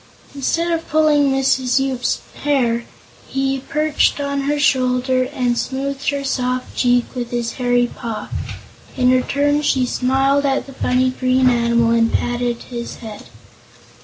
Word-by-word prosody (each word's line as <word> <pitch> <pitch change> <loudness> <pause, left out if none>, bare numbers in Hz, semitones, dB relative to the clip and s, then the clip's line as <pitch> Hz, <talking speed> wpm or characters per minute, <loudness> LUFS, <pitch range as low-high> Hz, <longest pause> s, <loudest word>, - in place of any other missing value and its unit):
Instead 330 +5 -1
of 330 -1 -2
pulling 305 -2 +3
Mrs. 265 -1 +1
Yoop's 265 -2 -1 0.2
hair, 240 -5 +1 0.4
he 270 0 -1
perched 300 +2 0
on 280 0 -1
her 295 - +1
shoulder 255 -2 +2
and 250 -4 0
smoothed 275 +2 -2
her 280 0 -2
soft 255 -2 -2
cheek 245 -1 +2
with 245 -2 -4
his 240 -1 -2
hairy 245 0 +3
paw. 230 -2 -6 0.7
In 250 -1 +4
return, 285 +3 +1
she 265 -3 +1
smiled 270 +3 +1
at 275 -1 0
the 275 - -11
funny 255 0 +1
green 255 0 +2
animal 235 -1 +2
and 230 0 +3
patted 240 -1 -1
his 235 -1 -6
head. 220 -3 -10
255 Hz, 140 wpm, -19 LUFS, 245-275 Hz, 0.7 s, In